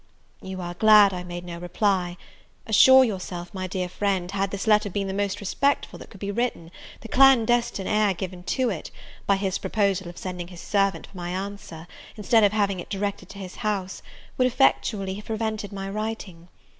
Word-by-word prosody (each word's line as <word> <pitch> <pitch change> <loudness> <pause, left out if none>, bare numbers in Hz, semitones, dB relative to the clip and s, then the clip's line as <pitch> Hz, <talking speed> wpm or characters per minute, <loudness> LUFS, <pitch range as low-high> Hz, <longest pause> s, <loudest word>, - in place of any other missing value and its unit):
You 190 -1 -6
are 175 0 -5
glad 210 +1 +6
I 180 -1 -4
made 175 0 -7
no 170 -1 -7
reply; 180 0 0 0.5
assure 260 +4 +7
yourself, 185 -6 -4
my 185 -1 -4
dear 185 0 -3
friend, 185 -1 -1
had 195 0 -1
this 200 +2 -4
letter 210 -1 +3
been 200 +1 -2
the 190 - -3
most 200 0 -1
respectful 280 +8 -1
that - - -12
could 200 - -14
be 200 +1 -3
written, 205 -7 -2 0.3
the - - -9
clandestine 240 -5 +4
air 210 -2 +2
given 185 0 -6
to 255 +1 0
it, 170 - -6 0.4
by 200 - +4
his 195 -1 -2
proposal 200 -4 0
of 175 - -12
sending 180 -2 -5
his 175 -1 -12
servant 195 0 0
for - - -20
my 175 -1 -5
answer, 190 -3 -6 0.3
instead 220 +1 +3
of 205 - +5
having 200 -3 0
it - - -8
directed 200 0 -3
to 200 - -11
his 185 -2 -8
house, 200 -4 -3 0.4
would 255 - +5
effectually 215 -6 +1
have 205 +2 -8
prevented 220 -2 -3
my 195 -1 -5
writing. 200 -4 -5
195 Hz, 190 wpm, -25 LUFS, 185-215 Hz, 0.5 s, assure